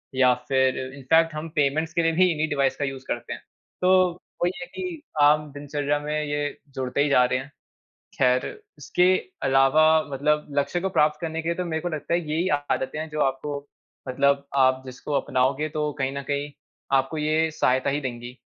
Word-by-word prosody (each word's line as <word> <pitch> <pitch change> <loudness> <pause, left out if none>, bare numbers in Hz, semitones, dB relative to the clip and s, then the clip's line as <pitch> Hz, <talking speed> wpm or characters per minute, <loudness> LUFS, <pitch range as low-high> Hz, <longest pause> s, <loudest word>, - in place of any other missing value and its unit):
या 130 -1 +5
फिर 130 -1 +2 0.2
इन्फ़ैक्ट 160 +4 +2
हम 155 +2 -4
पेमेंट्स 155 +2 +1
के 170 - +1
लिए 165 - +3
भी 180 +2 +3
इन्ही 155 -1 0
डिवाइस 140 -3 +1
का 145 - -1
यूज़ 135 -1 -6
करते - - -4
हैं। - - -9 0.4
तो 185 -1 +4 0.3
वही 175 - +2
है - - -4
कि 360 -4 -5 0.2
आम 150 0 +4
दिनचर्या 145 0 -2
में 150 +1 -4
ये 145 0 -2 0.2
जुड़ते 130 +1 -1
ही 145 - 0
जा 125 -3 +5
रहे 125 +1 0
हैं। 135 +2 -10 0.7
ख़ैर 125 -1 +3 0.3
इसके 180 - +1 0.4
अलावा 135 +3 +4 0.3
मतलब 150 +2 0
लक्ष्य 160 +5 -1
को 190 - -1
प्राप्त 150 -4 +2
करने 165 -1 -3
के 165 - -6
लिए 170 - 0
तो 180 - -3
मेरे 160 -2 -2
को 175 - -2
लगता 155 +1 -3
है 170 - +3
यही 165 +4 0 0.2
आदतें 130 +3 -1
हैं 160 - -5
जो 150 0 -3
आपको 140 +2 -1 0.5
मतलब 140 +2 +2
आप 130 -1 +3
जिसको 130 +3 -7
अपनाओगे 130 +4 0
तो 150 0 -2
कहीं 135 0 0
न - - -3
कहीं 145 +1 -2 0.5
आपको 135 +4 -1
ये 155 +1 +1
सहायता 130 -3 +1
ही 145 +2 -1
देंगी। 125 -1 -6
145 Hz, 195 wpm, -25 LUFS, 135-160 Hz, 0.7 s, या